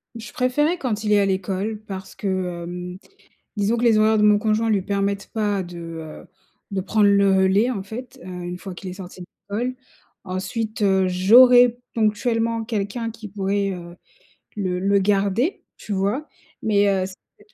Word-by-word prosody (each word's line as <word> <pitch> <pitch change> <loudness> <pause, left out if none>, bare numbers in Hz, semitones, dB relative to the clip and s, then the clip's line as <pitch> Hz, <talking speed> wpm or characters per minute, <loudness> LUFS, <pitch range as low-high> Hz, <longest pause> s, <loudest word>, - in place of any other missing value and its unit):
Je 220 -2 -8
préférais 295 +7 +1
quand 225 -8 -2
il 210 - 0
est 205 - +5
à 200 - +3
l'école 195 +2 -2
parce 190 -1 -7
que 185 -3 -3
hem, 180 +1 -6 0.6
disons 205 +3 +1
que 235 - -1
les 225 -2 +5
horaires 215 +1 +4
de - - +3
mon 210 -1 +5
conjoint 220 +1 +1
lui 205 -3 +2
permettent 200 +1 -2
pas 205 -3 0
de, 175 0 -9
heu, 165 -2 -8 0.4
de 195 -1 -1
prendre 210 +2 +2
le 200 0 +4
relais, 190 +4 +3
en 205 -6 -3
fait, 225 +6 -9
heu, - - -9
une 180 -1 -5
fois 190 0 -8
qu'il 185 - -8
est 180 - -6
sorti 185 -1 -10
de 180 - -8 0.3
l'école. 250 +2 -1 0.5
Ensuite, 200 +4 -4
heu, 190 -2 +3
j'aurais 245 +6 +6 0.2
ponctuellement 230 +1 0
quelqu'un 225 +1 -3
qui 225 -1 -9
pourrait, 200 0 -1
heu, 175 -1 -8 0.6
le 185 -3 -1
le 200 +1 +3
garder, 205 - +1
tu 210 - -5
vois? 205 +10 -1 0.3
Mais 205 -1 +3
heu, 190 -1 +1
cette 205 +2 -15
200 Hz, 180 wpm, -22 LUFS, 190-225 Hz, 0.6 s, j'aurais